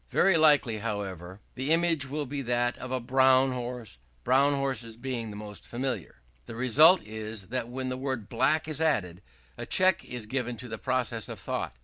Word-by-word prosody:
Very 190 Hz, -, +3 dB
likely, 145 Hz, -8 st, +4 dB
however, 100 Hz, -3 st, -5 dB
the 130 Hz, +3 st, -4 dB
image 165 Hz, -4 st, +2 dB
will 150 Hz, +1 st, -3 dB
be 140 Hz, +1 st, -4 dB
that 120 Hz, -1 st, 0 dB
of 130 Hz, -, -7 dB
a 130 Hz, -, 0 dB
brown 130 Hz, +1 st, +4 dB
horse, 120 Hz, -, -6 dB, 0.2 s
brown 140 Hz, -, +4 dB
horses 130 Hz, -5 st, -3 dB
being 120 Hz, -2 st, -4 dB
the 105 Hz, -, -8 dB
most 105 Hz, 0 st, -8 dB
familiar. 120 Hz, -, -4 dB, 0.2 s
The 115 Hz, -, -8 dB
result 150 Hz, -, +5 dB
is 110 Hz, -2 st, -6 dB
that 120 Hz, -1 st, -3 dB
when 130 Hz, +1 st, -4 dB
the 130 Hz, -, -3 dB
word 130 Hz, -5 st, -3 dB
"black" 135 Hz, +7 st, +1 dB
is 155 Hz, 0 st, -2 dB
added, 100 Hz, -, 0 dB, 0.4 s
a -, -, -5 dB
check 185 Hz, 0 st, +3 dB
is 120 Hz, -3 st, -6 dB
given 125 Hz, 0 st, -3 dB
to 125 Hz, -, -9 dB
the 110 Hz, -2 st, -6 dB
process 125 Hz, -3 st, -1 dB
of -, -, -7 dB
thought. -, -, -4 dB
125 Hz, 190 wpm, -28 LUFS, 110-135 Hz, 0.4 s, result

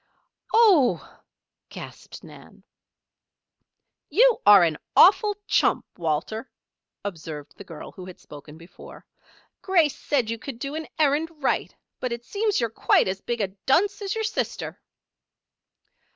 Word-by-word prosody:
"Oh!" 400 Hz, -, +3 dB, 0.5 s
gasped -, -, -11 dB
Nan. -, -, -15 dB, 1.5 s
"You -, -, +4 dB
are 205 Hz, -3 st, +9 dB
an 160 Hz, -3 st, 0 dB, 0.2 s
awful 415 Hz, +2 st, +6 dB
chump, -, -, +2 dB
Walter," 175 Hz, -, -3 dB, 0.6 s
observed 155 Hz, -6 st, -7 dB
the -, -, -11 dB
girl 165 Hz, -5 st, -10 dB
who 185 Hz, -1 st, -11 dB
had 185 Hz, -, -11 dB
spoken 150 Hz, +1 st, -13 dB
before. 165 Hz, +2 st, -14 dB, 0.6 s
"Grace 335 Hz, -7 st, +2 dB
said 250 Hz, -6 st, -1 dB
you 230 Hz, -, -4 dB
could 275 Hz, -2 st, -8 dB
do 275 Hz, +4 st, -5 dB
an 315 Hz, 0 st, -5 dB
errand 305 Hz, +1 st, +2 dB
right; -, -, -1 dB, 0.2 s
but 255 Hz, -, -3 dB
it 235 Hz, 0 st, -5 dB
seems 420 Hz, -, 0 dB
you're 230 Hz, -2 st, -1 dB
quite -, -, +2 dB
as 190 Hz, +1 st, -3 dB
big 240 Hz, -2 st, -3 dB
a 195 Hz, -, -1 dB, 0.2 s
dunce 405 Hz, +10 st, +2 dB
as 400 Hz, +1 st, -3 dB
your 445 Hz, -, -2 dB
sister." 435 Hz, -, -4 dB
240 Hz, 135 wpm, -24 LUFS, -, 1.5 s, are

